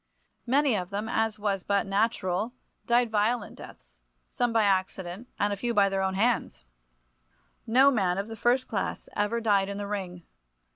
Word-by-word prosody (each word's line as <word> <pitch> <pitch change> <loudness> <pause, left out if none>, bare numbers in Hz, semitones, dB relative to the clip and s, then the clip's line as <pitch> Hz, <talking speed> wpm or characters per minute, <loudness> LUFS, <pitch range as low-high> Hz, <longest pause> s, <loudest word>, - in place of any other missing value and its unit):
Many 275 -1 +3
of 180 -3 -3
them, 205 +2 -3
as 225 -1 0
was 200 -2 -1
but 200 -1 +1
natural, 200 +1 0 0.3
died 240 -1 +3
violent 215 +1 0
deaths, - - -14 0.3
some 245 -1 -1
by 225 -1 +3
accident 190 +1 -1
and 205 0 +1
a - - -1
few 235 +4 -2
by 200 -1 +4
their 195 0 -1
own 190 0 -1
hands. 225 - 0 1.0
No 260 +5 +5
man 190 -7 +1
of 200 +1 -2
the 225 - -7
first 245 +4 +1
class - - -3
ever 210 +3 0
died 200 -3 +2
in 200 - -5
the 205 - -4
ring. 185 -4 -5
205 Hz, 175 wpm, -27 LUFS, 195-230 Hz, 1.0 s, No